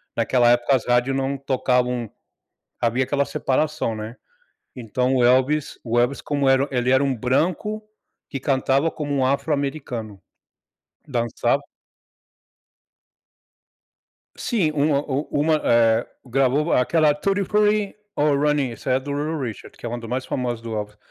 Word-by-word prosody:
naquela 120 +1 +3
época, 120 +3 +3
as 125 - -2
rádios 125 +2 +2
não 135 +1 -1
tocavam 125 -3 0 0.7
havia 120 +2 +1
aquela 140 +1 0
separação, 140 -2 -1
né. 110 +2 -7 0.6
Então, 125 +2 -1
o 125 - +3
Elvis 130 +4 +2
o 120 0 +1
Elvis, 125 +3 +1
como 140 -2 0
era 135 +1 +3
ele 125 -1 0
era 130 +2 +4
um 135 -2 0
branco 175 - -1 0.4
que 135 - -5
cantava 135 +3 +1
como 145 -2 -4
um 135 -2 +1
afro-americano. 135 -6 -2 0.9
Dançava 120 +1 0 2.8
Sim, 195 -11 0
uma 145 -1 +2
o 140 +1 -2
uma, 155 +2 +2
eh, 115 0 +3 0.2
gravou 135 +5 +1
aquela 155 +3 +3
tutti 195 +7 0
frutti, 210 +1 +1 0.2
oh 145 -1 +2
Rudy, 145 -2 +1
essa 115 +3 -4
é 130 - +3
do 140 +2 -6
Little 150 +2 -2
Richard, 120 -6 -7
que - - -10
é - - -2
um 120 +1 -4
dos 115 - -9
mais 130 +1 -2
famosos 120 -3 -3
do 115 -1 -5
Elvis. 105 0 -5
135 Hz, 145 wpm, -22 LUFS, 120-145 Hz, 2.8 s, era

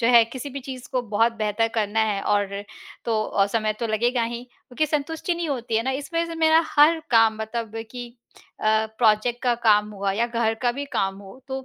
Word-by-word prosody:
जो 230 - +2
है 235 -1 +8
किसी 260 +4 -7
भी 275 +1 -6
चीज़ 255 -2 -8
को 255 - 0
बहुत 230 +2 +4
बेहतर 215 +1 +1
करना 220 0 0
है 210 -2 +1
और 205 -1 +1 0.6
तो 220 -2 +1
अ, 195 0 +1
समय 215 0 0
तो 235 - 0
लगेगा 235 +3 +1
ही 235 +1 -5
क्योंकि 250 +4 -4
संतुष्टि 315 +4 -2
नहीं 340 -1 -3
होती 240 -5 -2
है 225 - +2
ना। 260 - -1
इस 275 +4 -4
वजह 335 0 +1
से 335 - -6
मेरा 320 0 +4
हर 315 +3 +5
काम 225 -2 +5
मतलब 220 0 -4 0.2
कि 245 -1 -6 0.5
अ, 220 0 +2
प्रोजेक्ट 230 +2 +2
का 245 -1 +2
काम 210 0 +4
हुआ 200 -1 -2
या 230 +4 +1
घर 230 -2 0
का 245 -1 +2
भी 280 +3 -4
काम 195 0 0
हो 200 +6 -13
तो 265 0 -4
235 Hz, 220 wpm, -24 LUFS, 215-265 Hz, 0.6 s, है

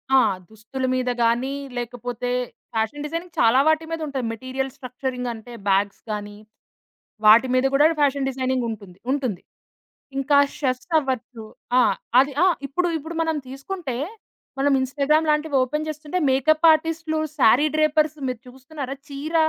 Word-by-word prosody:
ఆ! - - +8 0.3
దుస్తుల 225 +5 -5
మీద 255 -1 0
గానీ, 245 +4 +1 0.2
లేకపోతే 245 0 -4 0.4
ఫ్యాషన్ 225 +7 -1
డిజైనింగ్ 335 +3 -6
చాలా 230 +3 +5
వాటి 315 0 +3
మీదుంటుంది. 285 -7 -3
మెటీరియల్ 260 +3 -4
స్ట్రక్చరింగ్ 250 -1 -4
అంటే, 230 +2 -11 0.2
బ్యాగ్స్ 200 +1 +1
గానీ 205 0 -5 0.9
వాటి 225 +4 +8
మీద 255 +1 +3
కూడా 290 +2 +5
ఫ్యాషన్ 280 -1 +2
డిజైనింగుంటుంది 235 -8 -3
ఉంటుంది. 255 -10 -1 0.8
ఇంకా 280 +1 +3 0.2
చెఫ్స్ 255 +2 -2
అవ్వచ్చు. 250 -4 -4 0.4
ఆ! - - +7 0.4
అది 275 +1 +3
ఆ! - - +6 0.2
ఇప్పుడు, 350 +6 0
ఇప్పుడు 325 +3 -7
మనం 320 -1 0
తీసుకుంటే, 275 0 -5 0.6
మనం 280 0 +3
ఇన్‌స్టాగ్రామ్ 290 +4 +1
లాంటివి 300 -1 0
ఓపెన్ 300 +4 -2
చేస్తుంటే 305 +4 -3
మేకప్ 310 +5 +3
ఆర్టిస్టులు, 315 0 -1 0.2
సారీ 250 +6 +5
డ్రేపర్స్. 310 0 +2
మీరు 250 -1 -5
చూస్తున్నారా? 270 +1 -7
చీర 295 +4 -5
270 Hz, 130 wpm, -23 LUFS, 245-305 Hz, 0.9 s, ఆ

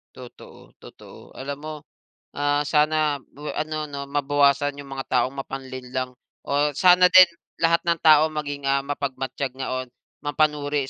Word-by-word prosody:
Totoo, 125 -1 -14
totoo. - - -15
Alam 140 +1 -6
mo, 155 - -5 0.6
ah, 145 0 0
sana 150 -1 +1
bwe 150 +2 -7
ano 155 0 -3
'no 140 -1 -7
mabawasan 145 0 +2
yung 140 - -13
mga 135 0 -6
taong 135 +2 +1
mapanlinlang, 130 -1 -5 0.3
o - - -15 0.2
sana 180 +3 +5
din 185 -1 +9 0.3
lahat 170 +1 +2
ng 170 -1 +1
tao 155 -1 +6
maging, 145 -2 -5
ah, 135 0 +2
mapagmatyag 135 -2 -4
nga 130 0 -5 0.2
on - - -25 0.4
mapanuri 145 -2 0
145 Hz, 145 wpm, -23 LUFS, 135-150 Hz, 0.6 s, din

